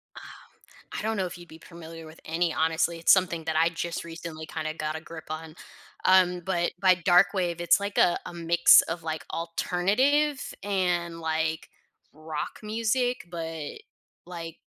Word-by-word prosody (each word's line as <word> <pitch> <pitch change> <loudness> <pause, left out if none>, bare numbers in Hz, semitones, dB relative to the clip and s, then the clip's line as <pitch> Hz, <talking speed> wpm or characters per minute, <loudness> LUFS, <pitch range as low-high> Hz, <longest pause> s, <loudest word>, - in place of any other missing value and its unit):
Um, - - -10 0.8
I - - -4
don't 220 0 -1
know 190 - 0
if 180 0 -7
you'd 175 0 -13
be 160 - -13
familiar 165 -1 -10
with 155 +1 -13
any, 165 +1 0
honestly, 160 +1 0
it's 165 - +5
something 180 -3 +1
that 160 -1 -2
I 165 +1 +4
just 170 0 -4
recently 165 -1 -8
kinda 155 0 -4
got 155 0 -3
a 160 - -5
grip 160 0 -10
on. 155 0 -6 0.5
Um, 180 -1 +4
but 175 -1 -1
by 185 -1 +5
dark 180 +2 +4
wave, 175 -3 -1
it's 170 +1 +4
like 200 0 -4
a 175 - +4
a - - -7
mix 170 0 +6
of, 165 0 -5
like, 160 -1 -4
alternative 250 - +1
and, 180 -4 -1
like, 160 0 -2 0.4
rock 155 -1 -6
music, 230 +3 -1
but, 165 -3 -6 0.5
like, 165 -2 -8
170 Hz, 165 wpm, -27 LUFS, 160-185 Hz, 0.8 s, mix